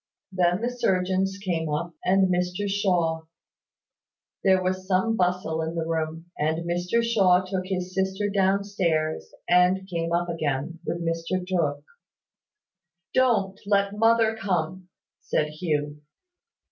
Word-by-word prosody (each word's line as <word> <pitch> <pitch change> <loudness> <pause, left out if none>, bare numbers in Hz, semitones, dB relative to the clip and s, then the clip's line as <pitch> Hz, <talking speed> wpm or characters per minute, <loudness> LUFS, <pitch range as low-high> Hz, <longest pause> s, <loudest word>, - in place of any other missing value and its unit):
Then 180 +1 +1
the 240 +1 -1
surgeons 190 -4 0
came 170 -5 -2
up, 170 +3 -2
and 190 0 +3
Mr 180 +3 -1
Shaw. 175 -5 0 1.2
There 190 -1 +4
was 185 0 -2
some 190 +4 +2
bustle 180 -4 0
in 160 +1 -3
the 165 -1 -1
room, 160 0 -3
and 160 +3 0
Mr 175 +7 0
Shaw 190 -6 +3
took 185 0 -3
his 185 -1 -3
sister 190 +2 0
down 200 0 +2
stairs, 165 -6 -1 0.2
and 180 +2 +3
came 170 -2 -2
up 175 +1 +1
again, 155 -1 -2
with 170 0 -2
Mr 165 +2 -2
Tooke. 150 -6 0 1.3
"Don't 210 -7 +2
let 200 0 +2
mother 225 0 +3
come," 185 -3 -2 0.3
said 150 - -1
Hugh. 150 -2 -2
180 Hz, 130 wpm, -25 LUFS, 165-195 Hz, 1.3 s, There